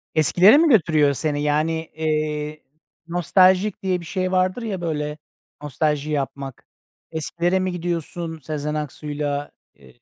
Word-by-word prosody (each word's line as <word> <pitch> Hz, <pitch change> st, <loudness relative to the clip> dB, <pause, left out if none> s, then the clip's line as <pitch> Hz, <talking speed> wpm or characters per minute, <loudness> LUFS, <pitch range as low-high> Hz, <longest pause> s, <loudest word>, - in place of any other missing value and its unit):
Eskilere 180 Hz, -, +6 dB
mi 325 Hz, 0 st, +4 dB
götürüyor 155 Hz, -, +4 dB
seni? 145 Hz, +1 st, -1 dB
Yani, 150 Hz, +2 st, +1 dB, 0.2 s
eee, 155 Hz, -1 st, -2 dB, 0.4 s
nostaljik 185 Hz, +4 st, +3 dB
diye 185 Hz, -2 st, 0 dB
bir 170 Hz, -, -10 dB
şey 185 Hz, +1 st, -2 dB
vardır 185 Hz, +5 st, +1 dB
ya, 200 Hz, -6 st, -4 dB
böyle, 150 Hz, -2 st, -3 dB, 0.4 s
nostalji 150 Hz, 0 st, -1 dB
yapmak. 135 Hz, -2 st, -4 dB, 0.5 s
Eskilere 170 Hz, +3 st, 0 dB
mi 185 Hz, 0 st, -1 dB
gidiyorsun 170 Hz, -1 st, -4 dB
Sezen 150 Hz, +1 st, -4 dB
Aksu'yla? 145 Hz, -1 st, -3 dB, 0.2 s
Iıı -, -, -19 dB
155 Hz, 125 wpm, -22 LUFS, 150-180 Hz, 0.5 s, Eskilere